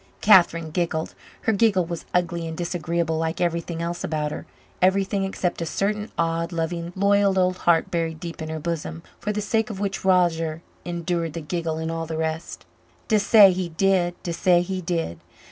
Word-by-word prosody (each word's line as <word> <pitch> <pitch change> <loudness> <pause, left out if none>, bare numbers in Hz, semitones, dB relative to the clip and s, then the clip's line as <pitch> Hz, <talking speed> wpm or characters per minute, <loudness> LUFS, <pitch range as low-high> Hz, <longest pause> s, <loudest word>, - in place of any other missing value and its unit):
Catherine 170 -5 +5
giggled. 165 -1 -1 0.3
Her 225 - +1
giggle 200 -4 +3
was 170 -1 -6
ugly 175 -2 0
and 160 0 -6
disagreeable 170 -2 -1
like 165 +1 -2
everything 170 -1 -1
else 170 +1 -3
about 150 -1 -2
her - - -7 0.3
everything 195 +1 +2
except 180 -2 -2
a - - -1
certain 210 +5 -1
odd, 165 0 0
loving, 170 0 -3
loyal 200 0 +3
old 185 0 +2
heart 165 -1 +3
buried 165 -2 -1
deep 170 -1 -7
in 155 - -4
her 160 - -3
bosom, 165 0 -4 0.2
for 210 - -2
the 210 0 -2
sake 225 +3 0
of 205 -3 -6
which 200 -1 -2
Roger 170 -3 +2 0.2
endured 170 -2 -2
the 170 - -4
giggle 160 +1 -3
and 160 0 -3
all 165 0 -3
the 160 0 -4
rest. 160 +1 -4 0.4
"Dessay 210 -2 +7
he 180 -1 -3
did 175 0 +1
dessay 175 0 +2
he 185 +1 -3
did. 165 - -2
170 Hz, 180 wpm, -24 LUFS, 165-190 Hz, 0.4 s, Dessay